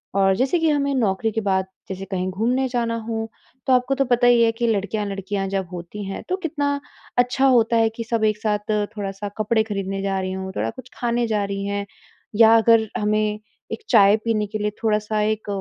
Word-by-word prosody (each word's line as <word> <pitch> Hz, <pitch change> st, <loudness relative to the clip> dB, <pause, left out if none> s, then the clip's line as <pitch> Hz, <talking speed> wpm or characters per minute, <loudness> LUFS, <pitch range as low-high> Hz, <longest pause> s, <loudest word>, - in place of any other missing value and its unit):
और 195 Hz, -1 st, +4 dB
जैसे 265 Hz, -, +1 dB
कि 325 Hz, -1 st, +2 dB
हमें 280 Hz, -2 st, +1 dB
नौकरी 220 Hz, -2 st, +1 dB
के 220 Hz, -, -2 dB
बाद, 190 Hz, -2 st, +1 dB, 0.2 s
जैसे 190 Hz, 0 st, -5 dB
कहीं 185 Hz, 0 st, -1 dB
घूमने 240 Hz, +7 st, 0 dB
जाना 235 Hz, -2 st, -1 dB
हो, 225 Hz, 0 st, -3 dB, 0.4 s
तो 260 Hz, -, +4 dB
आपको 250 Hz, +2 st, +2 dB
तो 275 Hz, 0 st, +1 dB
पता 245 Hz, -1 st, +3 dB
ही 240 Hz, -1 st, +5 dB
है 225 Hz, -, +4 dB
कि 235 Hz, +1 st, -2 dB
लड़कियाँ-लड़कियाँ 200 Hz, -2 st, -2 dB
जब 195 Hz, -1 st, -2 dB
होती 180 Hz, +4 st, -7 dB
हैं, 195 Hz, -, -6 dB
तो 370 Hz, -, 0 dB
कितना 290 Hz, -5 st, -1 dB, 0.4 s
अच्छा 250 Hz, +2 st, +2 dB
होता 235 Hz, -3 st, +4 dB
है 225 Hz, 0 st, +4 dB
कि 230 Hz, -, -3 dB
सब 230 Hz, -1 st, -1 dB
एक 215 Hz, -1 st, +1 dB
साथ 210 Hz, 0 st, -1 dB, 0.3 s
थोड़ा-सा 200 Hz, 0 st, -4 dB
कपड़े 220 Hz, +1 st, +2 dB
खरीदने 195 Hz, -2 st, -3 dB
जा 195 Hz, -1 st, -1 dB
रही 185 Hz, 0 st, -3 dB
हों, 190 Hz, 0 st, -5 dB
थोड़ा -, -, -1 dB
कुछ 255 Hz, -1 st, -11 dB
खाने 240 Hz, 0 st, 0 dB
जा 215 Hz, -2 st, 0 dB
रही 200 Hz, 0 st, -4 dB
हैं, 200 Hz, 0 st, -2 dB, 0.5 s
या 225 Hz, +1 st, +7 dB
अगर 225 Hz, 0 st, +4 dB
हमें 210 Hz, 0 st, 0 dB, 0.3 s
एक -, -, -3 dB
चाय 205 Hz, -3 st, +6 dB
पीने 220 Hz, -2 st, +1 dB
के 215 Hz, +2 st, -4 dB
लिए 210 Hz, 0 st, -1 dB
थोड़ा-सा 215 Hz, -1 st, +1 dB
एक 215 Hz, 0 st, -1 dB
215 Hz, 210 wpm, -22 LUFS, 200-235 Hz, 0.5 s, या